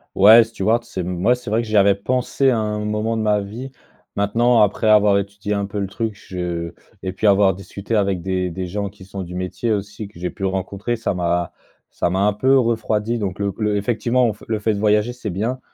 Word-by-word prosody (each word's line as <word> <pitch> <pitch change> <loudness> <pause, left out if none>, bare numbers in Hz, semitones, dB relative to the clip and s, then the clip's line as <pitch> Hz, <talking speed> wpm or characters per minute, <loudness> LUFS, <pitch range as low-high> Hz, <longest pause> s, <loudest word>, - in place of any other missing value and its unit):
Ouais, 110 +4 +8
steward, 115 +1 0
c'est, 95 -6 -5
mmh, 90 0 -4
ouais 125 +2 +5
c'est 125 -4 -8
vrai 110 +2 +2
que 115 - -7
j'y 110 0 +1
avais 100 0 +6
pensé 125 +6 0
à 120 - +2
un 105 -1 -2
moment 105 +2 -1
de 110 - -1
ma 105 -1 +2
vie. 115 +7 -7 0.4
Maintenant, 115 +3 +3
après 105 +2 0
avoir 105 -2 +5
étudié 100 +1 -4
un 100 -1 -1
peu 100 - -6
le 100 - -1
truc, 110 +1 -3
je 90 -4 -5 0.3
et 95 -1 -3
puis 100 +3 0
avoir 100 -1 +5
discuté 100 +4 -5
avec 100 -3 +1
des 95 -1 -1
des 90 +2 -4
gens 100 +3 -3
qui 95 -1 -15
sont 95 0 -7
du 90 -1 -7
métier 90 +6 -2
aussi, 105 0 -3
que 100 - -16
j'ai 90 0 -3
pu 95 - -5
rencontrer, 95 +4 -2
ça 115 -2 -2
m'a 85 -1 -1 0.4
ça - - -1
m'a 95 +2 0
un 105 - +3
peu 130 +6 +3
refroidi. 115 -1 0
Donc 95 -4 -3
le 100 -1 -2
le 105 -1 +1
effectivement, 120 +2 +1
f 105 - -18
le 110 - 0
fait 110 +1 +1
de 100 - -3
voyager, 105 +3 +2
c'est 125 -3 -6
bien, 110 +8 -2
105 Hz, 235 wpm, -20 LUFS, 95-110 Hz, 0.4 s, Ouais